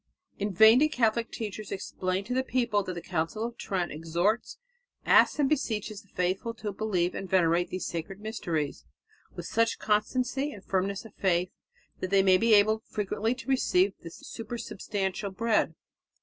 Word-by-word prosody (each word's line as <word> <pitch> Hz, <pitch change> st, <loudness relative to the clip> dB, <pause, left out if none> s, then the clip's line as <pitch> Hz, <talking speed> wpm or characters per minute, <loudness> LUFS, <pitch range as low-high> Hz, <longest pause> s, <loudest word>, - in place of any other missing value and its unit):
In 205 Hz, +1 st, -1 dB
vain 220 Hz, +6 st, +7 dB
did 305 Hz, -, +5 dB
Catholic 230 Hz, -3 st, +1 dB
teachers 215 Hz, -2 st, -6 dB
explain 185 Hz, 0 st, -2 dB
to 240 Hz, +5 st, -4 dB
the 260 Hz, -, +2 dB
people 235 Hz, -5 st, +1 dB
that 185 Hz, -2 st, -5 dB
the 170 Hz, -, -6 dB
Council 175 Hz, +5 st, -2 dB
of 235 Hz, 0 st, -5 dB
Trent 185 Hz, -6 st, -2 dB
"exhorts, 170 Hz, +8 st, -1 dB, 0.5 s
asks -, -, +5 dB
and 290 Hz, -2 st, +3 dB
beseeches 220 Hz, -7 st, -1 dB
the -, -, -26 dB
faithful 190 Hz, +6 st, -2 dB
to 215 Hz, -2 st, -4 dB
believe 185 Hz, -4 st, 0 dB
and 190 Hz, -, -6 dB
venerate 175 Hz, -1 st, +3 dB
these 185 Hz, -, -4 dB
sacred 170 Hz, +3 st, -5 dB
mysteries... 170 Hz, -9 st, -3 dB, 0.5 s
with -, -, -6 dB
such 230 Hz, 0 st, +1 dB
constancy 255 Hz, +7 st, 0 dB
and 200 Hz, -, -12 dB
firmness 195 Hz, +2 st, -1 dB
of 220 Hz, -, -12 dB
faith... 180 Hz, -1 st, +1 dB, 0.5 s
that 185 Hz, -, -3 dB
they 195 Hz, 0 st, +4 dB
may 185 Hz, -1 st, +5 dB
be 225 Hz, -1 st, +5 dB
able 215 Hz, +2 st, +4 dB
frequently 215 Hz, +3 st, -1 dB
to 260 Hz, -, -11 dB
receive 200 Hz, -7 st, +2 dB
the 165 Hz, -, -8 dB
supersubstantial 205 Hz, -1 st, -4 dB
bread." 230 Hz, -1 st, +1 dB
205 Hz, 165 wpm, -28 LUFS, 185-225 Hz, 0.5 s, vain